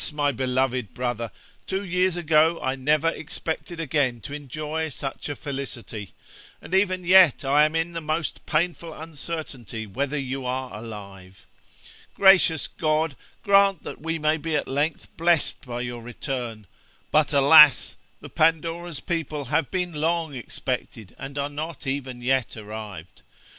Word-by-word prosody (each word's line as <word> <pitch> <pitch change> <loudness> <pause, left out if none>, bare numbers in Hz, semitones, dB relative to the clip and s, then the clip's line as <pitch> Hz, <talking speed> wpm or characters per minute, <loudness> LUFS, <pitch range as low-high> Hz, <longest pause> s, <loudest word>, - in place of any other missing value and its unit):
my 145 -1 +1
beloved 130 -2 -1
brother, 120 -2 -2 0.4
two 190 +1 -2
years 180 0 +1
ago 160 -1 +3
I 130 0 0
never 150 +4 +2
expected 165 +1 -5
again 140 -6 0
to 140 - -8
enjoy 150 +3 -4
such 135 0 -5
a 145 - -3
felicity, 120 -8 -6 0.4
and - - -11
even 185 -2 +2
yet 175 -6 +6
I 145 +3 +5
am 155 +1 -2
in 165 +1 0
the 165 -1 -4
most 155 +1 -2
painful 170 0 -1
uncertainty 150 - -6
whether 140 +8 -2
you 135 -1 -3
are 130 0 -3
alive. 100 -4 -10 0.7
Gracious 190 -5 +5
God, 155 -2 0 0.3
grant 200 -3 +4
that - - -8
we 165 +1 -2
may 155 0 +2
be 160 0 -2
at 150 - 0
length 145 +4 -1
blessed 170 -2 +2
by 120 0 -4
your 120 -1 -5
return 120 -2 -5
I - - -35 0.4
but, 155 0 +3
alas! 145 0 +7 0.3
the - - -9
Pandora's 165 0 0
people 155 -5 -3
have 150 +5 0
been 180 -2 -2
long 160 0 0
expected, 120 -4 -5
and 135 +2 -7
are 140 0 0
not 150 +2 -6
even 130 -2 -4
yet 130 -3 0
arrived. 105 -5 -8
145 Hz, 150 wpm, -25 LUFS, 125-165 Hz, 0.7 s, alas